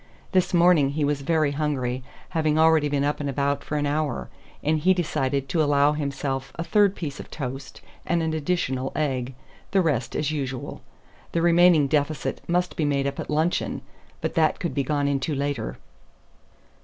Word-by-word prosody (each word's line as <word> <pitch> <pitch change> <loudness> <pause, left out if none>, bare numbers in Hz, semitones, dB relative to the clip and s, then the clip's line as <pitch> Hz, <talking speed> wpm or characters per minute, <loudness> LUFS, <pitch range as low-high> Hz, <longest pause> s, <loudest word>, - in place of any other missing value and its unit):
This 185 -1 +2
morning 170 -5 +5
he 150 0 0
was 145 -1 0
very 155 0 +1
hungry, 135 -4 -2 0.3
having 155 -1 +1
already 160 -2 +4
been 140 -1 0
up 145 +1 0
and 145 -1 -2
about 140 +1 0
for 150 - -3
an 145 - 0
hour; 145 - -1 0.3
and 155 +1 +2
he 185 +5 +4
decided 140 -6 -1
to 160 - +1
allow 145 -1 +4
himself 135 -2 -3
a 165 - -3
third 205 +1 +3
piece 145 -5 -5
of - - -9
toast 135 -1 -6 0.2
and 170 0 0
an 160 0 -1
additional 140 -5 -1
egg; 130 -4 -1 0.3
the 195 - +2
rest 135 -9 -1
as 150 0 0
usual. 135 -4 -4 0.5
The 165 - +1
remaining 170 -3 +5
deficit 145 -1 -1
must 180 +1 +1
be 160 - -1
made 140 -2 +1
up 140 0 -3
at - - -5
luncheon; 155 +3 0 0.4
but - - -2
that 160 -3 +2
could 170 - -2
be 140 - 0
gone 145 +1 0
into 140 +2 -1
later. 140 -5 -2
145 Hz, 180 wpm, -25 LUFS, 140-160 Hz, 0.5 s, morning